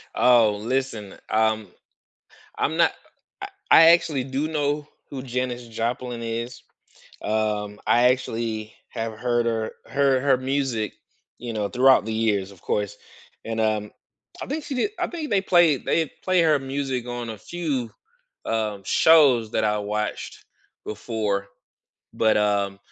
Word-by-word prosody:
Oh, 115 -4 +4
listen, 115 -4 -3 0.2
um, 110 -1 +1 0.9
I'm - - 0
not - - +4 0.5
I - - -5 0.2
I - - +9
actually 160 -6 +2
do 135 +3 -2
know 150 -1 -1 0.2
who 135 -2 -6
Janice 125 -1 -3
Joplin 120 +1 -3
is. 115 +2 -5 0.6
Um, 105 -1 -1
I 120 +1 +4
actually 115 -4 -3
have 115 -1 -4
heard 120 +1 0
her 110 -1 -1
heard 135 -2 +2
her 140 -2 +4
music, 130 -4 -2 0.4
you 120 -1 -6
know, 105 -2 -2
throughout 130 -1 +4
the 110 - -4
years, 105 -3 0
of 95 -3 -17
course, 105 0 -2 0.5
and, 115 0 -3
um 110 -1 0 0.5
I - - -5
think 295 +2 -4
she 275 - -5
did 265 +11 0
I - - 0
think 320 -4 -6
they 200 - +3
played 175 -7 +3
they'd 160 -3 +1
play 185 -2 +3
her 155 -3 +4
music 135 -2 -3
on 120 -1 -5
a 110 - -8
few, 140 - -3 0.5
um, 110 -3 -2
shows 135 - +5
that 110 - +1
I 105 0 +1
watched 105 +1 -4 0.4
before. 105 -2 -3 0.7
But, 110 -1 +3
um, 100 -1 0
120 Hz, 145 wpm, -24 LUFS, 110-135 Hz, 0.9 s, I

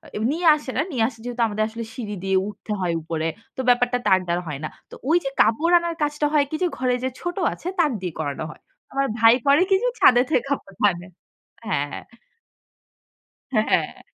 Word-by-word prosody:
এ - - -2
নিয়ে 335 +3 0
আসে 295 -3 -6
না। - - +3
নিয়ে 245 -6 +1
আসা, 230 -2 -9
যেহেতু 245 0 -3
আমাদের 215 0 -1
আসলে 230 +1 -6
সিঁড়ি 215 -3 -5
দিয়ে 190 0 +2
উঠতে 210 +1 -8
হয় 175 -2 0
উপরে। 160 0 -2 0.3
তো - - -10
ব্যাপারটা 245 0 +3
তার 190 -2 +5
দ্বারা 175 +1 0
হয় 145 -3 -5
না। 155 - -3 0.2
তো - - -15 0.2
ওই 330 - +5
যে, 270 - -1
কাপড় 315 +10 +3
আনার 340 -1 -3
কাজটা 295 0 0
হয় 295 -2 +4
কি? 315 - -3
যে, - - +3
ঘরে 250 -1 +1
যে, 260 - 0
ছোট 350 0 -4 0.2
আছে, - - -9
তাকে 300 -7 +3
দিয়ে 180 -3 -4
করানো 145 -2 -3
হয়। - - -16 0.3
আমার 275 0 +1
ভাই 225 0 +7
করে 280 +3 +5
কি? 385 - +5
যে, - - +2
ছাদে 245 -1 +7
থেকে 315 - +2
কাপড় 195 -9 -4
আনে 175 0 -9 0.6
হ্যাঁ, - - 0
হ্যাঁ। - - -7 1.5
হ্যাঁ, 215 -3 +3
হ্যাঁ। - - 0
245 Hz, 210 wpm, -23 LUFS, 195-295 Hz, 1.5 s, ভাই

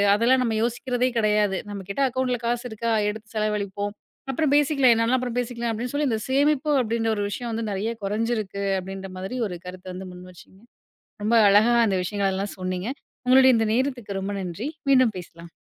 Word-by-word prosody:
அதெல்லாம் 250 +4 +3
நம்ம 225 -2 0
யோசிக்கிறதே 245 +1 0
கெடையாது. 210 -3 +2
நம்ம 200 -1 -6
கிட்ட 200 +8 -2
அக்கவுண்ட்ல 255 -1 -1
காசு 240 0 0
இருக்கா? 230 +1 -2 0.2
எடுத்துச் 220 +1 -8
செலவழிப்போம். 205 -1 -2 0.4
அப்பறம் 285 +1 +1
பேசிக்கலாம். 275 -3 +4
என்னன்னாலும் 230 +3 +2
அப்புறம் 245 -1 -3
பேசிக்கலாம் 235 -1 -2
அப்படின்னு 240 +4 -4
சொல்லி 290 0 +1
இந்தச் 220 -2 -2
சேமிப்பு 290 +2 +2
அப்படின்னு 225 -1 0
ஒரு 205 - -2
விஷயம் 235 +3 -4
வந்து 225 0 -2
நிறைய 200 +4 -2
கொறைஞ்சுருக்கு 210 -1 -2 0.2
அப்படின்ற 195 +1 -7
மாதிரி 190 +7 -5
ஒரு 180 -2 -6
கருத்த 180 0 -9
வந்து 185 +1 -7
முன்வச்சீங்க. 180 +1 -14 0.6
ரொம்ப 230 +2 +2
அழகா 215 +4 +5
அந்த 195 -3 +1
விஷயங்கள 195 +1 -1
எல்லாம் 200 +1 -4
சொன்னீங்க. 185 +3 -3 0.4
உங்களோடைய 260 0 +7
இந்த 225 -1 +1
நேரத்துக்கு 245 -7 -2
ரொம்ப 200 +1 -3
நன்றி. 190 - -4 0.2
மீண்டும் 255 -6 +4
பேசலாம். 170 -1 -12
225 Hz, 175 wpm, -24 LUFS, 195-245 Hz, 0.6 s, உங்களோடைய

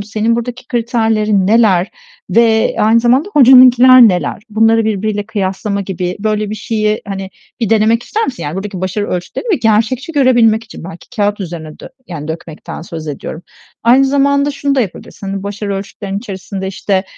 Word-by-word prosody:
Senin 215 +2 -1
buradaki 245 +1 -5
kriterlerin 220 -4 0
neler 205 -4 +3 0.4
ve 225 -1 +2
aynı 225 +2 +4
zamanda 255 - +2
hocanınkiler 255 -2 +7
neler? 180 +1 -2
Bunları 225 +1 +3
birbiriyle 210 -1 -2
kıyaslama 200 -1 -2
gibi 180 -2 -4
böyle 215 -1 -1
bir - - -3
şeyi, 215 -1 -2
hani, 195 -1 -5 0.3
bir 225 -3 -1
denemek 225 +1 +3
ister 445 - -2
misin? 250 - -5
Yani 145 +2 -4
buradaki 195 -1 -5
başarı 190 +3 -2
ölçütlerini 180 - -4
bir 370 - +1
gerçekçi 230 +7 0
görebilmek 240 -6 +3
için 220 -6 -11
belki 175 -1 -11
kâğıt 205 0 0
üzerine 160 -4 -7
dö - - -10 0.2
yani 155 -4 -7
dökmekten 160 0 -7
söz 165 -2 -8
ediyorum. 150 +3 -7 0.4
Aynı 250 +4 +5
zamanda 280 +1 +2
şunu 280 0 -2
da 270 - +2
yapabilirsin: 200 -1 -6
Hani 195 0 -4
başarı 200 0 -4
ölçütlerin 195 0 -5
içerisinde, 190 -2 -6
işte, 190 0 -1
215 Hz, 165 wpm, -14 LUFS, 195-235 Hz, 0.4 s, hocanınkiler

